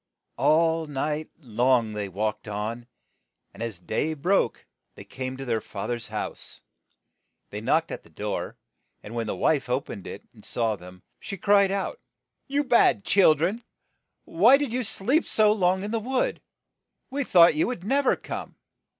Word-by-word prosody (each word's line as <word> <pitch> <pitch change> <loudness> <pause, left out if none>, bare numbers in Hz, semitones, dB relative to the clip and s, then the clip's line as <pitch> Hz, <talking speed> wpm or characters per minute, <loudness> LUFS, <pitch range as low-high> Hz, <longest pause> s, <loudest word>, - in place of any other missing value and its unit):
All 160 0 +3
night 150 +2 -2
long 120 -4 +1
they 105 -2 -4
walked 105 +4 -3
on, 110 +3 -4 0.7
and - - -12
as 115 -4 -4
day 110 - -2
broke 180 +7 0 0.3
they - - -10
came 130 0 -6
to 135 - -6
their 115 -3 0
fath 100 +4 -5
er's 120 -1 -4
house. - - -6 0.9
They - - -5
knocked - - +1
at - - -5
the - - -21
door, - - -4 0.5
and 105 - -9
when 115 -2 -2
the - - -2
wife 145 -5 +1
o 125 +1 +2
pened 100 -8 -9
it, - - -8
and - - -18
saw 115 -2 0
them, 90 -1 -14 0.2
she 195 - -6
cried 200 +1 +4
out, 200 - -2 0.5
"You 285 +1 0
bad 240 -6 +3
chil 185 -6 +5
dren, 185 +10 -1 0.6
why 225 +11 +5
did 280 -5 -3
you 255 0 0
sleep 235 - 0
so 215 -1 +4
long 190 -2 +2
in 205 - -4
the 230 - 0
wood? 250 +3 -1 0.7
We 280 +1 -1
thought 175 -8 +6
you 155 - +1
would 235 -8 -4
nev 275 +6 +1
er - - +5
come - - -7
160 Hz, 175 wpm, -26 LUFS, -, 0.9 s, thought